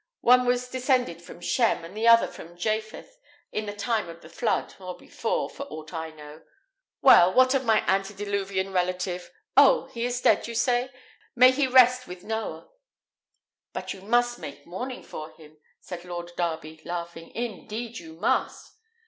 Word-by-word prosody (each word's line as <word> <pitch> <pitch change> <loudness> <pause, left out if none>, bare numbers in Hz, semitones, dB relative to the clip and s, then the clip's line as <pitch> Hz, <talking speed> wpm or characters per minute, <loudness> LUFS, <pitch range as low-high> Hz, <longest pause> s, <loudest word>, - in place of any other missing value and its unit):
One 250 +1 +5
was 245 0 +1
descended 250 - 0
from 170 0 -12
Shem, 220 -5 +1
and 175 +4 -11
the 225 +2 0
other 230 0 +7
from 175 +1 -11
Japheth, 215 - -3 0.3
in 215 0 -3
the 205 - -5
time 215 -3 -1
of 165 0 -11
the - - -13
flood, 235 - -1
or 185 -1 -7
before, - - -2
for 280 - -8
aught 155 - -9
I 160 -1 -4
know. 150 0 -12 0.6
Well, 175 +1 +8
what 255 +4 +5
of 265 -1 0
my 220 -2 +3
antediluvian 195 0 -1
relative? 180 0 -1 0.3
Oh! - - +6
he 235 -2 -3
is 245 0 -1
dead, 220 -3 +3
you 235 - -6
say? 245 +2 +1 0.5
May 255 +1 +8
he 270 +1 +1
rest 255 0 +5
with 180 0 -9
Noah!" 220 - -5 1.0
"But - - -4
you 190 - -12
must 240 +4 +1
take 145 0 -9
mourning 245 +9 -6
for 155 +1 -8
him," 155 -1 -17 0.2
said 175 -1 -8
Lord 175 -1 -6
Darby, 160 -2 -3
laughing; 170 -1 -6
"indeed 230 0 -5
you 160 -2 -11
must." 170 +7 -1
205 Hz, 165 wpm, -26 LUFS, 175-245 Hz, 1.0 s, Well